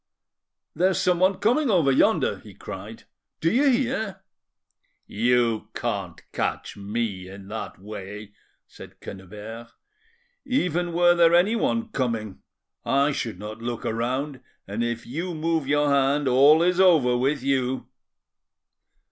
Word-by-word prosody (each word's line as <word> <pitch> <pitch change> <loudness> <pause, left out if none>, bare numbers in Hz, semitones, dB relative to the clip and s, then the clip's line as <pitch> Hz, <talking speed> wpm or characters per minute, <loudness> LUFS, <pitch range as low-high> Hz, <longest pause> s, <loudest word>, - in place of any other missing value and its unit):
"There 180 +4 +2
is 190 - 0
someone 185 +2 +3
coming 250 +6 +2
over 170 -9 +3
yonder," 130 - +2
he 105 -3 -14
cried,—"do 105 - -6
you 275 +5 +4
hear?" 235 -7 -1 0.8
"You 115 -1 +1
can't 100 -8 -3
catch - - -3
me 100 -2 -4
in 95 0 -11
that 110 +1 -6
way," 105 +1 -9 0.4
said - - -14
Quennebert. 105 +4 -9 0.8
"Even 180 - -1
were 175 +1 +5
there 170 -1 +5
anyone 225 +5 +2
coming, 115 - -3 0.4
I 140 +2 +2
should 115 -8 -4
not 105 +3 -8
look 120 0 -4
round, 130 +4 -2 0.3
and 105 +4 -2
if 120 -1 -3
you 165 +7 -4
move 160 -2 -1
your 145 0 +2
hand 140 +1 +2
all 140 +6 +6
is 180 +1 +2
over 160 -10 +5
with 135 +2 0
you." 130 -1 0
135 Hz, 125 wpm, -25 LUFS, 110-175 Hz, 0.8 s, all